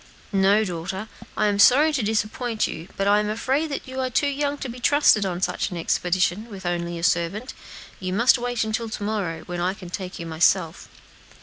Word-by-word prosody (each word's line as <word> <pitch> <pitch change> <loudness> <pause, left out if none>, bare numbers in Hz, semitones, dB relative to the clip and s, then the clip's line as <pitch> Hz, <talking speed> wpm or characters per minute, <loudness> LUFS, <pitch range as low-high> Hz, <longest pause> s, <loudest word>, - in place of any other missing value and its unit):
"No, 195 +2 +4
daughter; 190 +3 -5 0.3
I 215 - +2
am 205 -1 +1
sorry 295 +8 +6
to 270 - 0
disappoint 220 +2 -1
you, 165 +2 -6
but 195 - 0
I 205 +1 +5
am 210 0 -1
afraid 275 +7 -1
you 260 0 -6
are 260 -1 0
too 255 +4 +1
young 285 0 -1
to 270 - -5
be 245 +1 -8
trusted 245 -7 +4
on 180 -1 -4
such 195 - -1
an 180 - -6
expedition 180 +5 0
with 195 -3 -9
only 175 -1 -2
a 165 - -7
servant. 180 +9 0 0.5
You 185 -1 -4
must 235 +6 +4
wait 245 -1 -1
until 220 +1 -2
to 220 - -5
morrow, 195 -6 -2
when 175 +1 -5
I 185 +2 0
can 180 -3 -11
take 185 -1 -5
you 170 - -6
myself." 165 +1 +1
205 Hz, 205 wpm, -24 LUFS, 180-245 Hz, 0.5 s, sorry